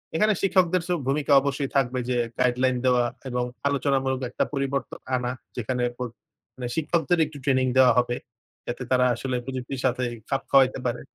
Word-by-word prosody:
এখানে 215 Hz, +5 st, +3 dB
শিক্ষকদের 185 Hz, -2 st, +3 dB
চেয়েও 170 Hz, -7 st, -1 dB
ভূমিকা 145 Hz, +1 st, 0 dB
অবশ্যই 140 Hz, 0 st, -2 dB
থাকবে 130 Hz, -2 st, +1 dB
যে 125 Hz, -, +1 dB, 0.2 s
গাইডলাইন 125 Hz, 0 st, +2 dB
দেওয়া 125 Hz, -1 st, +4 dB, 0.2 s
এবং 125 Hz, 0 st, -1 dB, 0.2 s
আলোচনামূলক 135 Hz, -1 st, 0 dB
একটা -, -, 0 dB
পরিবর্তন 140 Hz, -1 st, -2 dB, 0.2 s
আনা 125 Hz, -1 st, -1 dB, 0.3 s
যেখানে 125 Hz, +1 st, -1 dB
প -, -, -56 dB, 0.6 s
মানে 125 Hz, -2 st, -5 dB
শিক্ষকদের 165 Hz, +2 st, +1 dB
একটু 150 Hz, -1 st, -10 dB
ট্রেনিং 130 Hz, -2 st, +2 dB
দেওয়া 130 Hz, -1 st, +7 dB
হবে। 120 Hz, 0 st, 0 dB, 0.5 s
যাতে 120 Hz, +1 st, -4 dB
তারা 125 Hz, 0 st, +4 dB
আসলে 130 Hz, +2 st, -3 dB
প্রযুক্তির 130 Hz, 0 st, -5 dB
সাথে 125 Hz, 0 st, +1 dB, 0.3 s
খাপ 135 Hz, -, 0 dB
খাওয়াইতে 135 Hz, -1 st, +5 dB
পারে। 120 Hz, -, -1 dB
130 Hz, 160 wpm, -25 LUFS, 125-140 Hz, 0.6 s, দেওয়া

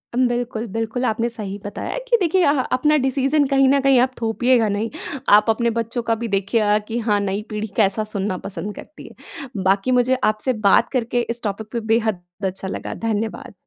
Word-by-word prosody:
उम, 255 Hz, 0 st, +3 dB
बिल्कुल, 240 Hz, -2 st, -2 dB
बिल्कुल। 225 Hz, +4 st, -3 dB
आपने 230 Hz, +1 st, 0 dB
सही 210 Hz, -4 st, -5 dB
बताया 205 Hz, -, -5 dB
है -, -, -3 dB
कि 475 Hz, -, +5 dB
देखिए 360 Hz, +1 st, +3 dB
अ, 285 Hz, -, +5 dB
ह 290 Hz, -, 0 dB, 0.2 s
अपना 300 Hz, +3 st, +3 dB
डिसीज़न 275 Hz, +2 st, +2 dB
कहीं 270 Hz, -1 st, +4 dB
न 280 Hz, +1 st, +4 dB
कहीं 270 Hz, -2 st, +4 dB
आप 255 Hz, +1 st, +2 dB
थोपिएगा 230 Hz, +1 st, +2 dB
नहीं। 205 Hz, +3 st, -1 dB, 0.5 s
आप 210 Hz, +2 st, +1 dB
अपने 235 Hz, +1 st, +2 dB
बच्चों 230 Hz, +2 st, -3 dB
का 230 Hz, 0 st, +1 dB
भी -, -, -1 dB
देखिएगा 210 Hz, +1 st, +2 dB
कि 230 Hz, -, -3 dB
हाँ, 205 Hz, -1 st, +3 dB
नई 200 Hz, 0 st, -2 dB
पीढ़ी 215 Hz, 0 st, -3 dB
कैसा 210 Hz, 0 st, +2 dB
सुनना 195 Hz, -2 st, -2 dB
पसंद 205 Hz, +1 st, -6 dB
करती 305 Hz, -, -11 dB
है। 250 Hz, -7 st, -9 dB
बाकी 195 Hz, +6 st, +2 dB
मुझे 255 Hz, +1 st, +2 dB
आपसे 215 Hz, +5 st, -2 dB, 0.2 s
बात -, -, +4 dB
करके 245 Hz, -2 st, 0 dB
इस 235 Hz, 0 st, -2 dB
टॉपिक 210 Hz, 0 st, -3 dB
पे 235 Hz, -, -2 dB
बेहद 220 Hz, -5 st, 0 dB, 0.2 s
अच्छा 190 Hz, 0 st, -3 dB
लगा -, -, -5 dB
धन्यवाद। 225 Hz, +4 st, -3 dB
230 Hz, 200 wpm, -21 LUFS, 210-255 Hz, 0.5 s, कि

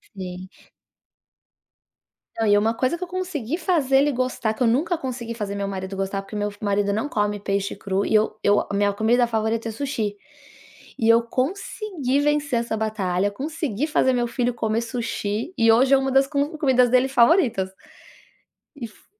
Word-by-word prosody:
Sim. 185 Hz, -1 st, -7 dB, 1.9 s
Não, 225 Hz, -, 0 dB
e 205 Hz, -, +4 dB
é 205 Hz, -, +5 dB
uma 225 Hz, +2 st, +1 dB
coisa 255 Hz, +8 st, 0 dB
que 360 Hz, -, -5 dB
eu 360 Hz, -, -5 dB
consegui 340 Hz, -6 st, -3 dB
fazer 310 Hz, -7 st, +2 dB
ele 290 Hz, +2 st, +3 dB
gostar, 255 Hz, -3 st, -1 dB
que 220 Hz, -, -14 dB
eu 245 Hz, -, +4 dB
nunca 300 Hz, +9 st, +1 dB
consegui 245 Hz, -4 st, -5 dB
fazer 205 Hz, -3 st, -4 dB
meu 200 Hz, 0 st, -2 dB
marido 190 Hz, 0 st, -5 dB
gostar, 195 Hz, 0 st, -2 dB
porque 195 Hz, +2 st, -10 dB
meu 205 Hz, 0 st, -1 dB
f 205 Hz, -, -16 dB
marido 200 Hz, 0 st, +1 dB
não 220 Hz, +8 st, -1 dB
come 210 Hz, -4 st, -1 dB
peixe 200 Hz, 0 st, -2 dB
cru 195 Hz, 0 st, -1 dB
e -, -, -1 dB
eu 215 Hz, 0 st, +2 dB
eu 205 Hz, 0 st, +4 dB
a -, -, -5 dB
minha 205 Hz, 0 st, +2 dB
comida 225 Hz, +4 st, +2 dB
favorita 225 Hz, 0 st, -1 dB
é -, -, -4 dB
sushi. 220 Hz, -5 st, -3 dB, 0.8 s
E 225 Hz, -, +1 dB
eu 230 Hz, +1 st, +5 dB
consegui 285 Hz, -, -2 dB
vencer 295 Hz, -4 st, +1 dB
essa 235 Hz, -1 st, -3 dB
batalha, 205 Hz, -3 st, -1 dB
consegui 290 Hz, 0 st, -3 dB
fazer 260 Hz, -3 st, +2 dB
meu 240 Hz, -1 st, 0 dB
filho 245 Hz, 0 st, -1 dB
comer 225 Hz, 0 st, -1 dB
sushi 230 Hz, -, -3 dB
e 230 Hz, 0 st, +5 dB
hoje 260 Hz, +4 st, +4 dB
é -, -, +7 dB
uma 270 Hz, 0 st, -1 dB
das 270 Hz, +1 st, +4 dB
com 290 Hz, +2 st, -1 dB
comidas 255 Hz, -4 st, +3 dB
dele 255 Hz, +2 st, +4 dB
favoritas. 240 Hz, -, +3 dB, 1.1 s
E 245 Hz, -5 st, -6 dB
f 210 Hz, -, -22 dB
230 Hz, 190 wpm, -23 LUFS, 205-270 Hz, 1.9 s, é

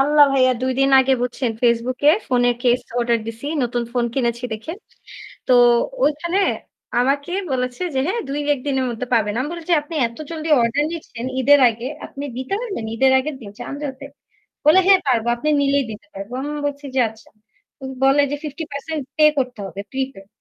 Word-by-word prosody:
আল্লাহ 290 Hz, +1 st, +6 dB
ভাইয়া 255 Hz, -1 st, +4 dB
২ 260 Hz, -, +1 dB
দিন 270 Hz, 0 st, +3 dB
আগে 265 Hz, 0 st, +2 dB
বুঝছেন 250 Hz, 0 st, -1 dB
Facebook 240 Hz, +1 st, +1 dB
এ -, -, +5 dB, 0.2 s
ফোনের 245 Hz, -1 st, +2 dB
কেস 245 Hz, 0 st, +3 dB, 0.2 s
অর্ডার 235 Hz, -1 st, +2 dB
দিছি 230 Hz, +5 st, -7 dB, 0.2 s
নতুন 240 Hz, 0 st, -1 dB
ফোন 245 Hz, -1 st, +1 dB
কিনেছি 235 Hz, -2 st, -1 dB
দেখে। 220 Hz, +9 st, -5 dB, 0.8 s
তো -, -, +5 dB, 0.5 s
ঐখানে 340 Hz, +6 st, 0 dB, 0.6 s
আমাকে 280 Hz, +6 st, 0 dB, 0.2 s
বলেছে 250 Hz, +5 st, -2 dB
যে -, -, 0 dB
"হ্যাঁ 455 Hz, +6 st, -1 dB
২-১ 290 Hz, -1 st, -1 dB
দিনের 265 Hz, -2 st, 0 dB
মধ্যে 240 Hz, +2 st, -5 dB
পাবেন।" 210 Hz, -3 st, +2 dB
আমি 285 Hz, -, -2 dB
বলেছি 340 Hz, +1 st, -4 dB
"আপনি 320 Hz, +2 st, -9 dB
এত 230 Hz, -, -15 dB
জলদি 320 Hz, -1 st, -4 dB
অর্ডার 240 Hz, +6 st, +1 dB
নিচ্ছেন 250 Hz, -7 st, -7 dB, 0.2 s
ঈদের 285 Hz, +2 st, +6 dB
আগে 230 Hz, +2 st, -7 dB, 0.2 s
আপনি 280 Hz, +1 st, -8 dB
দিতে 260 Hz, +9 st, -3 dB
পারবেন? 400 Hz, -, -4 dB
ঈদের 265 Hz, +3 st, +3 dB
আগের 285 Hz, +2 st, -3 dB
দিন 205 Hz, -, -9 dB
চাঁদ 280 Hz, -, -6 dB
রাতে?" 275 Hz, 0 st, -7 dB, 0.6 s
বলে, 315 Hz, +5 st, +7 dB
"হ্যাঁ 385 Hz, -2 st, +7 dB
পারবো, 235 Hz, -2 st, +1 dB
আপনি 300 Hz, +6 st, -2 dB
নিলেই 280 Hz, 0 st, +2 dB
দিতে 210 Hz, -1 st, -11 dB
পারবো।" 200 Hz, +5 st, -7 dB
আমি 295 Hz, +2 st, -4 dB, 0.2 s
বলছি 285 Hz, 0 st, -6 dB
যে -, -, +2 dB
আচ্ছা। 220 Hz, 0 st, -18 dB, 0.5 s
উম 265 Hz, -, -5 dB
বলে 275 Hz, +2 st, +5 dB
যে -, -, 0 dB
50% 295 Hz, 0 st, -5 dB, 0.2 s
পে 305 Hz, -, +6 dB
করতে 250 Hz, -4 st, -2 dB
হবে 195 Hz, +2 st, -10 dB
প্রিপেইড। 265 Hz, -7 st, -4 dB
265 Hz, 180 wpm, -21 LUFS, 240-290 Hz, 0.8 s, বলে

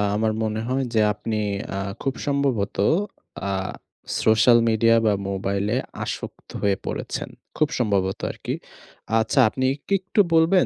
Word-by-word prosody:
আমার 110 Hz, +1 st, +1 dB
মনে 110 Hz, 0 st, -1 dB
হয় 130 Hz, +1 st, +1 dB
যে 110 Hz, -, +4 dB
আপনি 110 Hz, +1 st, -3 dB, 0.6 s
খুব 135 Hz, -1 st, 0 dB
সম্ভবত 140 Hz, -8 st, 0 dB, 0.7 s
আ -, -, 0 dB, 0.7 s
সোশ্যাল 115 Hz, +2 st, +6 dB
মিডিয়া 115 Hz, +1 st, +4 dB
বা 105 Hz, -, +4 dB, 0.2 s
মোবাইলে 100 Hz, +3 st, -1 dB, 0.3 s
আসক্ত -, -, -6 dB
হয়ে 100 Hz, -1 st, +2 dB
পড়েছেন। -, -, -4 dB, 0.3 s
খুব 155 Hz, -1 st, +3 dB
সম্ভবত 100 Hz, -4 st, +1 dB
আরকি। -, -, -4 dB, 0.6 s
আচ্ছা 110 Hz, +4 st, +1 dB
আপনি 130 Hz, +3 st, -2 dB, 0.2 s
কি 200 Hz, -, 0 dB
একটু 195 Hz, +3 st, +2 dB
বলবেন 165 Hz, +3 st, +5 dB
110 Hz, 130 wpm, -24 LUFS, 105-135 Hz, 0.7 s, সোশ্যাল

